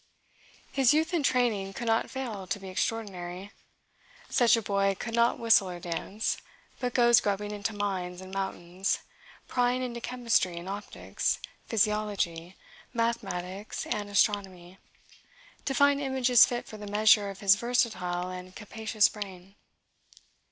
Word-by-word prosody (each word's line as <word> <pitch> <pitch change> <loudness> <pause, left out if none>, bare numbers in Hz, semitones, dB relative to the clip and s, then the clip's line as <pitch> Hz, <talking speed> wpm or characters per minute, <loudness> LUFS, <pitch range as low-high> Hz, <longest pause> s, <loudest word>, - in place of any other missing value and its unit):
His 270 0 +4
youth 315 +3 +1
and 335 -4 +1
training 230 -7 +1
could 240 - -5
not 225 0 +1
fail 225 -8 -5
to 220 0 -2
be 195 -1 -8
extraordinary. 190 -2 -3 0.8
Such 240 -1 +4
a - - -1
boy 195 -1 +1
could 230 - -5
not 235 0 +3
whistle 225 -5 +4
or 175 -1 -6
dance, 180 +5 -3 0.4
but 250 -1 -3
goes 240 -1 +6
grubbing 205 0 -1
into 205 +1 -3
mines 185 -3 -3
and 185 0 -10
mountains, 190 -1 -2 0.5
prying 250 0 +1
into 240 -1 -5
chemistry 230 -9 0
and 170 +2 -7
optics, 205 +2 -2 0.3
physiology, 205 -6 0 0.4
mathematics, 200 -4 -2
and 205 -1 -3
astronomy, 190 -3 0 0.9
to 270 - -1
find 285 0 +4
images 260 -3 +5
fit 240 -1 -3
for 215 - -10
the 210 -1 -8
measure 210 0 +4
of 195 +2 -9
his 200 -1 +7
versatile 200 -6 -1
and 185 0 -9
capacious 220 0 +1
brain. 195 -2 -8
205 Hz, 135 wpm, -29 LUFS, 190-235 Hz, 0.9 s, his